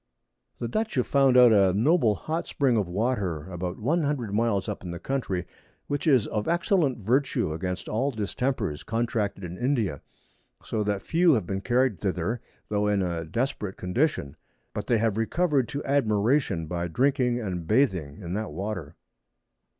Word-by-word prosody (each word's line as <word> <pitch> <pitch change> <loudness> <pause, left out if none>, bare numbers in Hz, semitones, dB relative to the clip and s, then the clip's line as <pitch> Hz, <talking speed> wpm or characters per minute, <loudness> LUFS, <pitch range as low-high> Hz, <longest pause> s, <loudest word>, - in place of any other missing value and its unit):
The 120 - -3
Dutch 220 - -2
have 125 - +2
found 135 -2 +4
out 125 -2 +8
a 95 -3 +5
noble 115 - +3
hot 160 - -3
Spring 135 -4 +1
of 105 -5 +1
Water 95 -5 -1
above 90 0 -4
100 140 - 0
Miles 105 -2 +1
up 105 -3 -4
in 90 - -6
the 85 - -5
Country, 95 -6 -2 0.4
which 145 +3 -2
is 130 -8 +5
of 105 -1 -3
excellent 170 - +2
virtue 120 - +1
against 90 +2 -4
all 130 +6 0
Distempers 110 - -2
contracted 115 -4 -1
in 90 0 -6
India; 115 - 0 0.6
so 110 -2 -2
that 100 -2 -1
few 170 0 +4
have 110 -8 +1
been 95 +2 -3
carried 125 +3 +1
thither, 95 +4 -2 0.3
tho' 105 0 +1
in 100 -2 +2
a 85 -2 -2
desperate 105 +1 -2
Condition, 90 - -1 0.4
but - - -4
they 120 - +3
have 110 -1 +1
recover'd 140 +3 +1
to 140 - -4
admiration 110 - +1
by 85 +2 -3
drinking 125 - +1
and 90 -7 -4
bathing 95 - +1
in 85 +1 -4
that 105 +2 -3
Water. 95 -6 -5
110 Hz, 165 wpm, -26 LUFS, 95-130 Hz, 0.6 s, out